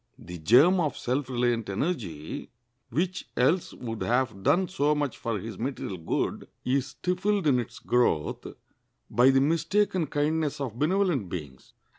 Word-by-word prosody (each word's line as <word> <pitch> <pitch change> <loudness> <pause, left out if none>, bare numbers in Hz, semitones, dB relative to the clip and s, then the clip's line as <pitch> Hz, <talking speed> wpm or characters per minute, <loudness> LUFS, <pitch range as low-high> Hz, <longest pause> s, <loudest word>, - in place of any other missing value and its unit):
The 90 0 -9
germ 135 - +6
of 155 -4 0
self 130 +2 -2
reliant 120 -3 0
energy, 100 - -3 0.4
which 175 +8 -2
else 150 +9 +2
would 115 -3 -6
have 120 -4 0
done 180 - +3
so 150 -5 +1
much 145 -4 -1
for 115 -2 -2
his 105 0 -7
material 115 -7 -4
good, 80 - -2 0.2
is 130 +1 +1
stifled 185 +5 -1
in 135 -4 +4
its 120 - -6
growth 120 -11 0 0.6
by 120 +4 +5
the 135 0 +4
mistaken 165 +4 +1
kindness 150 +1 0
of 125 -4 -4
benevolent 165 - +1
beings. 70 -8 -8
135 Hz, 145 wpm, -27 LUFS, 115-160 Hz, 0.6 s, germ